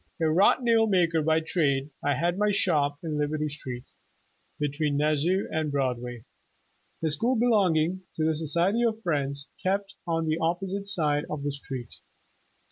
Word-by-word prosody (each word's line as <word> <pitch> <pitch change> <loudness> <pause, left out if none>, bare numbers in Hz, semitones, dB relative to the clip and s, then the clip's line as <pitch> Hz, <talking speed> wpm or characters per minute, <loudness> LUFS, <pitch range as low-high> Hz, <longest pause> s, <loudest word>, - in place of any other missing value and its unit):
A 165 - +1
wrought 180 +10 +4
nail 230 -2 +4
maker 170 -5 +2
by 160 +1 +2
trade, 145 -4 0
I 145 -1 +2
had 175 +5 0
my 210 0 +3
shop 150 -8 +2
in 155 -2 -2
Liberty 150 +1 -1
Street, 125 -4 -5 0.8
between 145 0 0
Nas 150 0 +2
sau 185 +4 +1
and 155 -2 -1
Broadway. 125 -4 -2 0.8
The 160 - +2
school 230 - +1
belonging 185 -7 +2
to 155 - 0
the 160 - +2
"So 155 +1 -4
ciety 195 +10 +2
of 225 0 -8
Friends'' 140 -4 -1
kept 195 +1 -1 0.2
en 165 0 0
the 155 +1 0
opposite 190 +4 -2
side 150 -7 +1
of 150 -2 -4
the 145 - -1
street. 135 -4 -7
160 Hz, 165 wpm, -27 LUFS, 145-185 Hz, 0.8 s, wrought